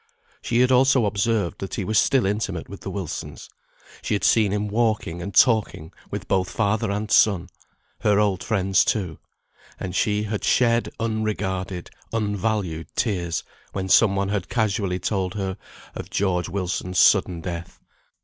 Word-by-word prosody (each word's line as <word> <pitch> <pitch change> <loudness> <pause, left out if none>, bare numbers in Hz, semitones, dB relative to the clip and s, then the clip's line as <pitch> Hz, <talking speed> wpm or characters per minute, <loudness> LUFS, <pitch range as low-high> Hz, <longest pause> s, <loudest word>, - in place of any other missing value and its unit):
She 120 +1 +1
had 125 +1 +3
also 130 -1 +4
observed 100 -2 0
that 95 - -5
he - - -2
was 105 +2 +2
still 135 -5 +3
intimate 100 -4 -2
with 100 - -9
the - - -6
Wilsons. 95 -4 -6 0.5
She - - -1
had 100 - -3
seen 110 -4 +4
him 105 +1 -1
walking 105 -6 0
and 100 +3 -5
talking 110 - +2 0.2
with - - -5
both 95 -2 +1
father 105 -2 0
and 105 +1 -3
son; 100 -5 +4 0.5
her 105 -1 +3
old 100 -3 +1
friends 95 -3 +2
too; 90 -8 -2 0.6
and 90 -1 -5
she 105 +1 +1
had 105 0 -3
shed 115 -1 +2
unregarded, 100 -5 -2 0.2
unvalued 105 -6 -1
tears, 90 -7 -1 0.3
when 95 -1 -3
some 100 0 +5
one 100 0 0
had 100 -3 -2
casually 100 -5 0
told 95 0 -2
her 95 -2 -2 0.4
of - - -7
George 90 -3 0
Wilson's 90 0 -3
sudden 85 0 +4
death. 85 0 -6
100 Hz, 155 wpm, -23 LUFS, 95-110 Hz, 0.6 s, some